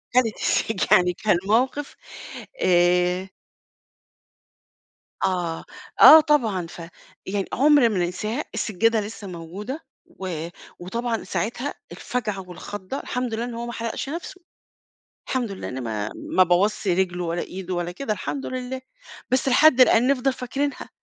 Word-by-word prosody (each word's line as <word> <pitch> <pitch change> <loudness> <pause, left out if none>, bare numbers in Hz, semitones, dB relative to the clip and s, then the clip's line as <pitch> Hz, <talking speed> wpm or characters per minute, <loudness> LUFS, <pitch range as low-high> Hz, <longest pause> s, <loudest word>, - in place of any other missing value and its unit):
خدت 230 -4 +3
السج 220 -4 +1
يعني، 180 0 +5
كان 205 -1 +1
موقف 255 +6 +1 0.7
آآ. 180 +1 +3 2.0
آه، 175 -3 -1 0.4
آه 315 +1 +11
طبعًا، 225 - +1
فيعني 180 +3 -7
عُمْر 285 -2 +5
ما 205 -4 -1
ننساها، 210 - -2
السجادة 220 +2 +1
لسّه 205 0 -7
موجودة 190 - -7 0.3
و 170 -3 -6 0.3
وطبعًا 230 +5 -3
ساعتها 245 +6 -3 0.2
الفجعة 210 -6 -4
والخضَّة، 205 +6 -6
الحمد 250 -2 -3
لله 230 +2 -2
إن 245 -1 -6
هو 235 +1 -5
ما 235 - -5
حرقش 230 +4 -4
نفسه، 345 +4 -6 0.9
الحمد 245 -5 -1
لله، 195 - -6
أنا 130 - -5
ما 110 -2 -3
ما 185 - +2
بوظش 195 +4 +1
رجله 180 -1 +1
ولا 170 +1 -2
إيده 185 0 -6
ولا 175 0 -2
كده، 215 +2 -3
الحمد 270 +7 -4
لله، 255 0 -5 0.5
بس 260 +1 +2
لحد 265 0 +6
الآن 245 0 +5
نفضل 270 -1 +2
فاكرينها 270 +3 -3
215 Hz, 130 wpm, -24 LUFS, 180-250 Hz, 2.0 s, آه